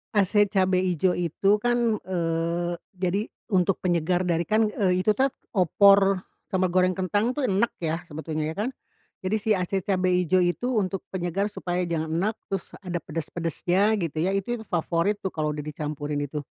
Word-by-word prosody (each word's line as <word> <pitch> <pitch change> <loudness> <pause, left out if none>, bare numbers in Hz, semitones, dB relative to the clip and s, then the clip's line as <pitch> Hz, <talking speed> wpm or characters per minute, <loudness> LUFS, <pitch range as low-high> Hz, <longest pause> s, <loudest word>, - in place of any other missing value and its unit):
Ase 205 0 +4
cabe 185 -2 +2
ijo 180 0 +1
itu 180 +4 +2
kan, 240 -2 +2
eee, 170 -1 -1 0.2
jadi 185 +2 +1 0.3
untuk 190 -2 +2
penyegar 180 0 +1
dari 170 -1 +1
kan, 215 +5 +2
eee, 190 -3 +1
itu 210 +3 +2
tuh 270 +3 +2 0.2
opor 195 +1 +5 0.3
sama 185 -1 +2
goreng 185 +1 +3
kentang 205 +5 0
tuh 260 0 -1
enek 200 +5 +2
ya 165 0 -2
sebetulnya 155 -1 -4
ya - - -8
kan? 220 +4 0 0.5
Jadi 185 +3 0
si 220 +2 -4
ase 185 +1 -1
cabe 185 -1 0
ijo 180 0 +3
itu 175 +7 0
untuk 195 -2 0
penyegar 185 +2 -1
supaya 180 -3 -2
jangan 160 -2 -2
enek, 195 +7 0 0.2
terus 195 -2 -4
ada 175 -2 -3
pedas-pedasnya, 170 +6 0
gitu 165 -2 -3
ya. 185 +4 +1
Itu 220 +5 -1
yang 220 - -10
favorit 175 +3 0
tuh 190 - 0
kalau 150 -1 -1
udah 150 - -4
dicampurin 150 -1 -4
itu. 145 +1 -4
185 Hz, 175 wpm, -26 LUFS, 170-200 Hz, 0.5 s, opor